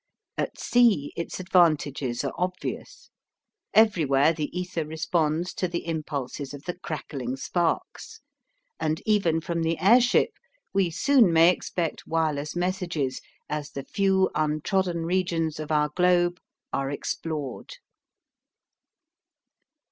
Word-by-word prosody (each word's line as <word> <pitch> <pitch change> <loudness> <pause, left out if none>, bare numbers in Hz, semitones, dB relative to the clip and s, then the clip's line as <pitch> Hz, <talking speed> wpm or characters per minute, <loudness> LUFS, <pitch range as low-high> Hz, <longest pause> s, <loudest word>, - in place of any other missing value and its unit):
At - - -3
sea 230 -12 +3
its 170 - -5
advantages 150 -8 +2
are - - -2
obvious. 180 +1 -5 0.6
Everywhere 160 -9 +4
the 155 -2 -2
ether 180 0 -3
responds 160 +2 -1
to 185 - -1
the 170 0 -4
impulses 145 -4 -4
of 140 - -12
the 175 - -3
crackling 140 -7 -5
sparks, 175 - -2 0.6
and 155 +1 0
even 185 -7 +2
from 170 +1 -2
the 165 0 0
airship 240 +7 +5 0.4
we 195 -3 +2
soon 240 - +4
may 165 +2 +6
expect 175 -2 -3
wireless 155 -2 -1
messages 175 -7 -2 0.3
as 150 -1 -4
the 140 - -6
few 190 +1 +2
untrodden 165 +3 0
regions 170 -3 0
of 155 0 -5
our 150 -1 +2
globe 175 +1 +2 0.3
are 135 0 -1
explored. 145 -1 -4
165 Hz, 115 wpm, -26 LUFS, 150-180 Hz, 0.6 s, may